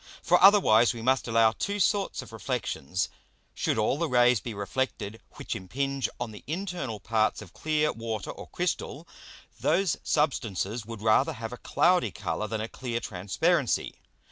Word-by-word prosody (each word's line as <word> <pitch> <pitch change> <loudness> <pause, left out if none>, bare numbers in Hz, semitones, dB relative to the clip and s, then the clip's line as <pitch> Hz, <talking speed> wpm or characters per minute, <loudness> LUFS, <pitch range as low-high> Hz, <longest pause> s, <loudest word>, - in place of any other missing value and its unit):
For 180 - +4
otherwise 120 - +6
we 115 - -7
must 130 +1 +2
allow 115 -1 +4
two 200 - -3
sorts 200 +1 +1
of - - -14
Reflexions. 90 +7 -2 0.5
Should - - -1
all 110 +6 +1
the 170 -2 0
Rays 125 -2 +5
be 115 0 -6
reflected 105 0 -3
which - - -5
impinge 135 +6 -2
on 115 - -3
the 105 - -11
internal 170 - -4
parts 110 +1 +1
of 100 -4 -11
clear 155 -1 0
Water 115 -2 -4
or - - -10
Crystal, - - -3 0.5
those 190 -3 +2
Substances 115 - -1
would 115 -2 -7
rather 110 -1 +3
have 115 +1 -6
a - - -7
cloudy 180 +8 +2
Colour 110 - -3
than 110 -1 -3
a 110 - -3
clear 120 -1 -4
Transparency. 120 - 0
120 Hz, 160 wpm, -28 LUFS, 110-150 Hz, 0.5 s, otherwise